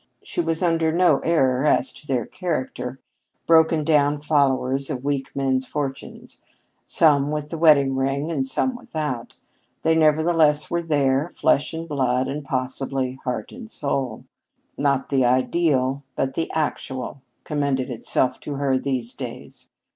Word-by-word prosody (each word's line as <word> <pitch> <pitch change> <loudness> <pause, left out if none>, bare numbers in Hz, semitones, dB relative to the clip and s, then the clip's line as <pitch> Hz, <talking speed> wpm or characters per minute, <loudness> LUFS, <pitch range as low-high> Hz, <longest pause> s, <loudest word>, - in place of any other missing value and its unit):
She - - -2
was 165 +1 0
under 165 -2 +2
no 170 -4 +3
error 135 -6 +2
as 150 - +2
to 150 - -14
their 125 -4 0
character. 130 -7 -4 0.5
Broken 160 -1 +4
down 145 -1 +2
followers 135 -2 +1
of 130 -4 -4
weak 140 -1 -2
men's 130 -1 0
fortunes, 140 -2 -6 0.5
some 145 -3 +4
with 150 0 -3
the 165 - -5
wedding 140 -4 +5
ring 135 +4 -1
and 140 -5 0
some 250 - 0
without, 155 - -5 0.5
they 160 - +3
nevertheless 155 -1 +3
were 170 0 0
there, 145 -2 +1
flesh 140 - +2
and 165 +1 -5
blood, 130 -3 0
and 145 +2 -4
possibly 130 0 -2
heart 125 -4 -3
and 235 -2 -10
soul. 135 - -3 0.5
Not 140 -1 0
the 135 -2 +2
ideal 130 +1 +1
but 135 0 -1
the 165 - -2
actual 135 -4 -3 0.2
commended 140 -4 -1
itself 125 +2 0
to 145 - -6
her 135 -2 +1
these 130 -3 -2
days. - - -8
140 Hz, 145 wpm, -23 LUFS, 130-160 Hz, 0.5 s, wedding